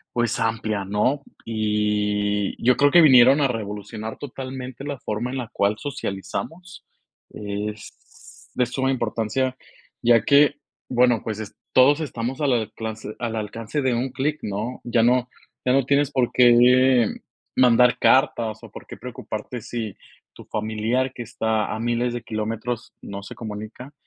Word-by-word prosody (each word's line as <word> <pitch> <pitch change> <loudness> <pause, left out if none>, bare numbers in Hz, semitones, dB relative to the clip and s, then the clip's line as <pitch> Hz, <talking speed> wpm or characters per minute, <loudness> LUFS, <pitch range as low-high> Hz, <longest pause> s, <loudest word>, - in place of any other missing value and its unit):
pues, 120 -1 0
amplia, 110 -2 -1
¿no? 105 +9 0 0.2
Y 105 -2 0
yo 125 +1 +4
creo 145 0 +4
que 175 - +7
vinieron 130 -2 +7
a 140 - +3
revolucionar 110 -1 -5
totalmente 130 -1 -7
la 140 -2 -5
forma 115 +3 -3
en 135 - -4
la 125 -3 -4
cual 100 +2 +1
socializamos. 145 - -6 0.5
Es 105 0 -8
de 125 - +1
suma 130 +2 -1
importancia, 120 +2 -1 0.5
ya 115 -1 +5
que, 145 0 +5 0.3
bueno, 125 -2 +3
pues 110 -1 -4
es 110 - -8 0.2
todos 145 +4 +5
estamos 130 0 -4
al 145 - +2
alclance 110 -2 -3
al 115 -2 -3
alcance 110 +6 -4
de 130 -2 +1
un 125 +3 -1
clic, 140 +4 -2
¿no? 105 +5 -4
Ya 120 -1 +1
no 125 +1 +3 0.3
ya 125 - +2
no 135 0 +3
tienes 140 +1 +2
por 130 -4 +1
qué 125 0 +5 0.5
mandar 125 -1 +5
cartas, 115 -5 +2
o, 115 - -10
por - - -11
qué - - -9
preocuparte 120 +1 -6
si 110 -3 -5 0.4
tu - - -13
familiar, 110 +5 -1
que 120 - -6
está 110 -2 -1
a 110 - -4
miles 120 +1 0
de 120 - -4
kilómetros, 115 +2 -4
no 100 0 -7
se - - -9
comunica. 110 +5 -8
120 Hz, 150 wpm, -23 LUFS, 110-130 Hz, 0.5 s, que